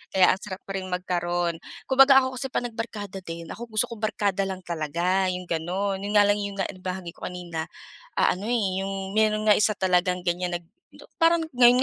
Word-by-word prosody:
kaya 185 -1 +6
ang 190 - -5
sarap 190 -2 -7
pa 195 - -8
ring 185 0 -5
magkaroon. 175 -2 -1 0.3
Kumbaga 270 0 +7
ako 260 -1 -3
kasi 265 - -2
'pag - - -1
nagbarkada 215 -4 -6
din, 165 -1 -7
ako 235 +2 -7
gusto 215 - +5
kong 225 -1 -8
barkada 200 -2 0
lang 190 -1 -6
talaga, 175 +3 0
yung 180 0 -5
gano'n. 190 +4 -1
Yun 205 - -3
nga 205 - +8
lang 205 0 +2
yung 200 -1 -4
na - - +2
nabahagi 185 -1 -5
ko - - -6
kanina, 170 -3 -5 0.5
ah, - - +4
ano, 205 +5 -5
eh, 195 -6 0
yung 195 0 -4
meron 215 0 +2
nga 210 - +7
isa 210 +1 +3
talagang 180 -1 +1
ganyan 175 0 0
nag 170 - -24 0.3
na - - -15 0.2
parang 330 0 +4
ngayon 245 -1 +6
190 Hz, 210 wpm, -25 LUFS, 180-215 Hz, 0.5 s, nga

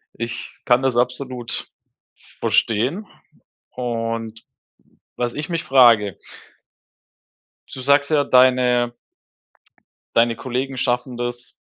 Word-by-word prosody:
Ich 115 0 -6
kann 125 +1 +4
das 130 -2 0
absolut 125 0 -2 0.7
verstehen. 125 - +1 0.7
Und 115 -2 -4 0.7
was 120 -1 -2
ich 150 +3 -5
mich 165 -1 -2
frage 115 -7 +5 1.6
du 130 - -7
sagst 140 +2 +3
ja 145 -2 +3
deine 125 -2 +3 1.2
deine 115 0 +3
Kollegen 130 +1 -4
schaffen 125 -1 -1
das 120 0 -6
125 Hz, 90 wpm, -21 LUFS, 120-130 Hz, 1.6 s, frage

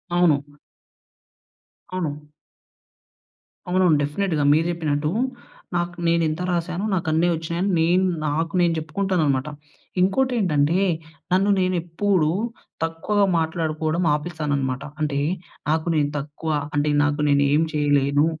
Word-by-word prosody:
అవును. 145 -4 +2 1.4
అవును. 150 -3 -4 1.4
అవునవును. 180 -4 +3
డెఫినిట్‌గా. 155 0 -1
మీరు 160 +2 +2
చెప్పినట్టు 150 -2 -1 0.6
నాకు 175 0 -1
నేనెంత 165 0 +1
రాసాను 175 +3 -2
నాకు 175 -3 -1
అన్ని 165 +3 +2
వచ్చినాయి 165 +1 -3
అని 175 -5 +2 0.4
నాకు 160 +4 -1
నేను 170 -1 +3
చెప్పుకుంటానన్నమాట. 155 -4 0 0.5
ఇంకోటేంటంటే 190 - +2 0.5
నన్ను 195 +2 +3
నేను 185 0 +1
ఎప్పుడు 175 -2 +1 0.5
తక్కువగా 195 +5 +1
మాట్లాడుకోవడం 160 +1 -1
ఆపేస్తాననమాట. 145 -5 -2 0.2
అంటే 140 -2 0 0.5
నాకు 160 +2 0
నేను 145 -1 +2
తక్కువ 150 +3 -5 0.3
అంటే 145 +1 +2
నాకు 145 +1 0
నేను 140 0 +4
ఏమి 160 +2 +3
చేయలేను 145 0 +2
160 Hz, 105 wpm, -23 LUFS, 150-175 Hz, 1.4 s, నేను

